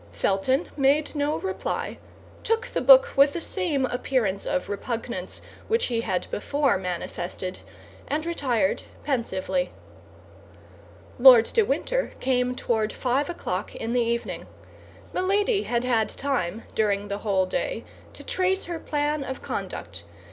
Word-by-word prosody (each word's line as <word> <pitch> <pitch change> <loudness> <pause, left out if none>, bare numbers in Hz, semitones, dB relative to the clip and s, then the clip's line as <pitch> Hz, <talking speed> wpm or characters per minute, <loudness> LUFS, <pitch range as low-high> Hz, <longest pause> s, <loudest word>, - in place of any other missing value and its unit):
Felton 195 - +1
made 285 +2 +2
no 295 0 0
reply, 385 0 -3 0.4
took 455 +2 +1
the - - -2
book - - +7
with 280 +1 +6
the - - -2
same 330 -6 0
appearance 245 -6 -1
of 275 -1 -1
repugnance 220 -2 -4 0.3
which 455 +1 +2
he 230 - +1
had 190 -5 -1
before 280 +5 +1
manifested, 180 0 -4 0.5
and 305 +2 -1
retired 250 - 0 0.2
pensively. 270 -1 -1 1.5
Lord 245 -3 +9
de 460 - +5
Winter 475 - 0
came 250 -1 +1
toward 220 -3 0
five 265 +5 0
o'clock 200 - -4
in 225 - -4
the 245 0 +2
evening. 235 0 -2 0.7
Milady 400 +3 +2
had 235 0 0
had 230 -3 +2
time, 235 -7 -2
during 205 -2 +1
the 200 0 -3
whole 195 -3 +1
day, - - -2 0.3
to - - -10
trace 375 +1 0
her 340 -1 -4
plan 295 -1 -1
of 265 -1 -6
conduct. - - -5
260 Hz, 135 wpm, -25 LUFS, 220-310 Hz, 1.5 s, Lord